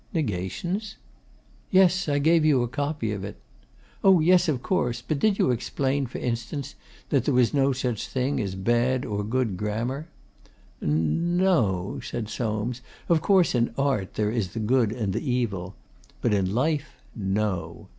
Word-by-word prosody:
'"Negations"?' 155 Hz, -, -2 dB, 0.7 s
'Yes; 185 Hz, -2 st, +4 dB
I 145 Hz, -, +2 dB
gave 160 Hz, +3 st, +4 dB
you 145 Hz, -5 st, +4 dB
a -, -, -1 dB
copy 145 Hz, -3 st, -2 dB
of 100 Hz, -2 st, -4 dB
it.' 100 Hz, -, -7 dB, 0.6 s
'Oh 190 Hz, -2 st, +6 dB
yes, 180 Hz, +3 st, +4 dB
of 130 Hz, -5 st, -1 dB
course. 125 Hz, -11 st, 0 dB
But 155 Hz, -, 0 dB
did 205 Hz, +4 st, +2 dB
you -, -, +3 dB
explain 135 Hz, +3 st, -1 dB
for 120 Hz, -, -7 dB
instance 125 Hz, +4 st, -3 dB, 0.4 s
that 135 Hz, -4 st, +2 dB
there 140 Hz, -, +2 dB
was 125 Hz, -2 st, +3 dB
no 140 Hz, -1 st, +3 dB
such 125 Hz, -4 st, -2 dB
thing 130 Hz, +2 st, -1 dB
as 100 Hz, -4 st, -2 dB
bad 120 Hz, +6 st, +1 dB
or 105 Hz, -2 st, -2 dB
good 115 Hz, -3 st, -1 dB
grammar?' 115 Hz, -, -3 dB, 0.7 s
'N 80 Hz, -, +1 dB
no,' 110 Hz, -, +1 dB
said 110 Hz, -3 st, -4 dB
Soames. 115 Hz, +2 st, -2 dB, 0.3 s
'Of 165 Hz, -2 st, +4 dB
course 185 Hz, 0 st, +4 dB
in 120 Hz, -2 st, 0 dB
Art 135 Hz, -9 st, 0 dB
there 105 Hz, -1 st, 0 dB
is 110 Hz, -6 st, -2 dB
the 115 Hz, -, -3 dB
good 115 Hz, 0 st, +2 dB
and 110 Hz, -5 st, -2 dB
the -, -, -2 dB
evil. 100 Hz, -7 st, -2 dB, 0.4 s
But 115 Hz, -, +1 dB
in 95 Hz, -2 st, +1 dB
Life 150 Hz, +6 st, 0 dB, 0.2 s
no. 95 Hz, -5 st, -2 dB
125 Hz, 165 wpm, -26 LUFS, 105-145 Hz, 0.7 s, Oh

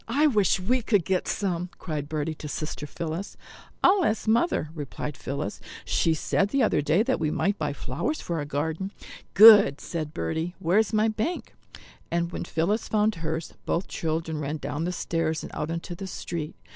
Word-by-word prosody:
I 275 Hz, +7 st, +3 dB
wish 210 Hz, -9 st, +3 dB
we 245 Hz, +7 st, +1 dB
could 205 Hz, -6 st, +2 dB
get 185 Hz, -1 st, 0 dB
some," 180 Hz, -3 st, -1 dB
cried 150 Hz, -4 st, -4 dB
Bertie 155 Hz, 0 st, -2 dB
to 155 Hz, -, -8 dB
sister 150 Hz, -1 st, -4 dB
Phillis. 170 Hz, +5 st, -5 dB, 0.5 s
"I'll 385 Hz, 0 st, +5 dB
ask 220 Hz, -5 st, 0 dB
Mother," 225 Hz, -, +2 dB
replied 150 Hz, -1 st, -5 dB
Phillis; 130 Hz, -7 st, -4 dB, 0.3 s
"she 165 Hz, -1 st, +2 dB
said 195 Hz, +5 st, +1 dB
the 270 Hz, +3 st, +2 dB
other 215 Hz, -, +2 dB
day 155 Hz, +8 st, +3 dB
that 260 Hz, +2 st, 0 dB
we 155 Hz, -, +1 dB
might 200 Hz, +6 st, 0 dB
buy 150 Hz, -2 st, -1 dB
flowers 140 Hz, -, -3 dB
for 170 Hz, -, -3 dB
our 145 Hz, -, -2 dB
garden." 160 Hz, +6 st, -2 dB, 0.4 s
"Good," 205 Hz, -8 st, +9 dB
said 155 Hz, -3 st, -4 dB
Bertie, 160 Hz, -, -3 dB
"where's 195 Hz, +5 st, +2 dB
my 215 Hz, 0 st, +3 dB
bank?" 225 Hz, +11 st, -2 dB, 0.6 s
And 170 Hz, 0 st, -1 dB
when -, -, -4 dB
Phillis 180 Hz, +8 st, 0 dB
found 215 Hz, 0 st, +2 dB
hers, 160 Hz, 0 st, -3 dB
both 170 Hz, -, 0 dB
children 160 Hz, -1 st, -2 dB
ran 150 Hz, +1 st, -2 dB
down 145 Hz, +3 st, -3 dB
the 180 Hz, -, -1 dB
stairs 165 Hz, -2 st, -1 dB
and -, -, -7 dB
out 150 Hz, +1 st, -3 dB
into 170 Hz, +1 st, -4 dB
the 190 Hz, +3 st, -6 dB
street. 165 Hz, -4 st, -5 dB
170 Hz, 185 wpm, -26 LUFS, 155-205 Hz, 0.6 s, Good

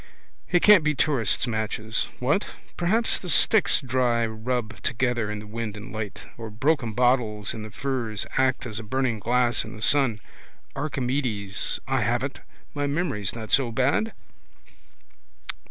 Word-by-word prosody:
It 175 Hz, -2 st, +2 dB
can't 210 Hz, -6 st, +7 dB
be 155 Hz, -1 st, +1 dB
tourists' 135 Hz, -8 st, +2 dB
matches. 110 Hz, -1 st, -1 dB
What? 145 Hz, +11 st, 0 dB, 0.3 s
Perhaps 215 Hz, +7 st, +1 dB
the 180 Hz, -, -8 dB
sticks 215 Hz, +4 st, +5 dB
dry 125 Hz, -3 st, +1 dB
rub 110 Hz, -2 st, -4 dB
together 120 Hz, -2 st, 0 dB
in 105 Hz, -, -4 dB
the 105 Hz, -, -8 dB
wind 110 Hz, 0 st, -5 dB
and 105 Hz, -, -9 dB
light. 105 Hz, -3 st, -5 dB, 0.2 s
Or 115 Hz, -1 st, -6 dB
broken 120 Hz, +1 st, 0 dB
bottles 115 Hz, -4 st, +1 dB
in 110 Hz, -, -7 dB
the 110 Hz, -, -7 dB
furze 120 Hz, -4 st, -3 dB
act 130 Hz, -1 st, +1 dB
as 110 Hz, -2 st, -5 dB
a -, -, -7 dB
burning 125 Hz, 0 st, -1 dB
glass 120 Hz, +1 st, +1 dB
in -, -, -9 dB
the 105 Hz, -, -11 dB
sun. 130 Hz, -4 st, +4 dB, 0.6 s
Archimedes. 125 Hz, -8 st, -2 dB
I -, -, +1 dB
have -, -, 0 dB
it! -, -, -5 dB, 0.3 s
My 145 Hz, 0 st, -1 dB
memory's 140 Hz, -, -2 dB
not 110 Hz, -2 st, -7 dB
so 125 Hz, -2 st, +3 dB
bad. 140 Hz, -, +1 dB
120 Hz, 155 wpm, -25 LUFS, 110-135 Hz, 0.6 s, can't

